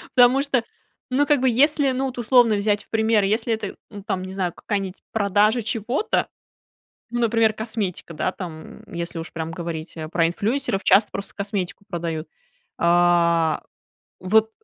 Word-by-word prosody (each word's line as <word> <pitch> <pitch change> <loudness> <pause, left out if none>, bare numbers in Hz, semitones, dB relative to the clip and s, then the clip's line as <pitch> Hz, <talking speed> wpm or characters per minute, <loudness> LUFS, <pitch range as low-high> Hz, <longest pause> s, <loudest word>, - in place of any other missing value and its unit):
потому 250 +1 +6
что 275 -4 0 0.5
Ну, 270 +3 +2
как 290 -3 +3
бы, 260 - +4
если, 280 +3 +3
ну 260 +1 -1
вот, 260 -2 -5
условно 240 -2 +4
взять 205 0 0
в - - -39
пример, 220 -2 +2
если 225 +3 +1
это, 220 -3 -4 0.2
м, 205 -2 -9
там, 190 -3 -2
не 185 - -7
знаю, 185 -3 -2
какая-нибудь 195 -3 -4
продажа 210 +2 +2
чего-то, 225 - -1 0.8
ну, 240 - -2
например, 225 -1 +3
косметика, 215 -6 -4
да, 155 +4 -1
там, 170 +2 -9
м, - - -16
если 170 0 -3
уж 165 - -7
прям 160 0 -4
говорить 165 -1 -6
о 155 - -5
про 165 0 +2
инфлюэнсеров, 225 +4 -1
часто 200 +3 +4
просто 200 - -4
косметику 200 -2 -4
продают. 165 -3 -4 0.5
А, 170 -2 +3 0.6
вот 220 +4 +3
205 Hz, 165 wpm, -23 LUFS, 175-230 Hz, 0.8 s, потому